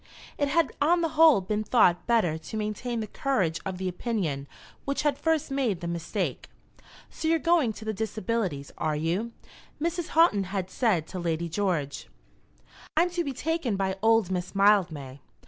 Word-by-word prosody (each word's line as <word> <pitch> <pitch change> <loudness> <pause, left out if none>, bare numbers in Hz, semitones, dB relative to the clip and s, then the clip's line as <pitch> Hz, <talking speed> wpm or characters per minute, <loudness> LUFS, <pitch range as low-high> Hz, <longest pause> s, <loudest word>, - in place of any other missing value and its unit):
It 285 - +2
had 335 +3 +2
on 340 +4 +4
the 330 - +1
whole 310 -8 +6
been 210 +3 -2
thought 180 -7 +3
better 220 -10 +2
to 160 +7 -7
maintain 220 +3 -3
the - - -3
courage 195 - -1
of 190 -1 -4
the 190 0 -3
opinion 180 - -2 0.4
which 280 +1 -2
had 295 -2 +2
first 320 -1 0
made 250 -9 0
the 170 - -5
mistake. 170 -1 -3 0.6
"So 320 - -4
you're 330 +1 +4
going 325 -6 +2
to 220 - -10
the 220 - -1
Disabilities, 215 -8 -2
are 155 -1 0
you?" 175 +10 -1 0.5
Mrs. 340 +2 -2
Houghton 210 - +5
had 190 0 -4
said 195 -11 +1
to 185 - -5
Lady 170 -1 -1
George. 165 -6 -2 0.9
"I'm 350 +2 +3
to 350 0 -1
be 280 - -3
taken 285 -4 -1
by 190 -1 -1
old 225 -4 +3
Miss 180 +1 -3
Mildmay." 170 -10 +2
210 Hz, 170 wpm, -27 LUFS, 175-275 Hz, 0.9 s, whole